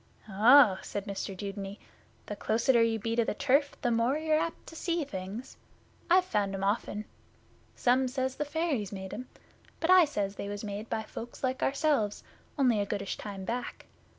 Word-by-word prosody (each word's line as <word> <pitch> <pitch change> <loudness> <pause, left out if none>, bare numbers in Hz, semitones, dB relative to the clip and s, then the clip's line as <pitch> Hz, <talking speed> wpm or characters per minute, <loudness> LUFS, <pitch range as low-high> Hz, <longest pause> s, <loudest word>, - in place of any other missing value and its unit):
'Oh,' 215 0 +6
said 200 -1 -5
Mr 195 -1 -5
Dudeney, 200 0 -5 0.5
'the 205 - -5
closeter 235 +3 +2
you 230 -1 +2
be 225 +2 -2
to 235 - +3
the 220 - -2
turf 280 +4 +2
the 240 - +2
more 235 +5 +2
you're 315 0 +1
apt 330 +1 -2
to 325 - -11
see 335 0 -1
things. 200 0 -7 0.5
I've 365 +1 +5
found 205 - 0
'em 195 - -4
often. 210 +1 -1 0.7
Some 255 +1 +3
says 260 0 -2
the 295 - 0
fairies 290 - -1
made 190 -1 -6
'em, 250 +3 -7 0.5
but 330 +2 +2
I 370 -2 +8
says 205 -8 -3
they 200 - -4
was 205 +1 -5
made 210 +1 -5
by 220 - -1
folks 235 +4 -9
like 260 0 -1
ourselves 275 -7 +1 0.3
only 250 -6 +3
a - - 0
goodish 200 -1 -3
time 195 -2 -7
back. 240 +3 -4
230 Hz, 180 wpm, -30 LUFS, 205-275 Hz, 0.7 s, I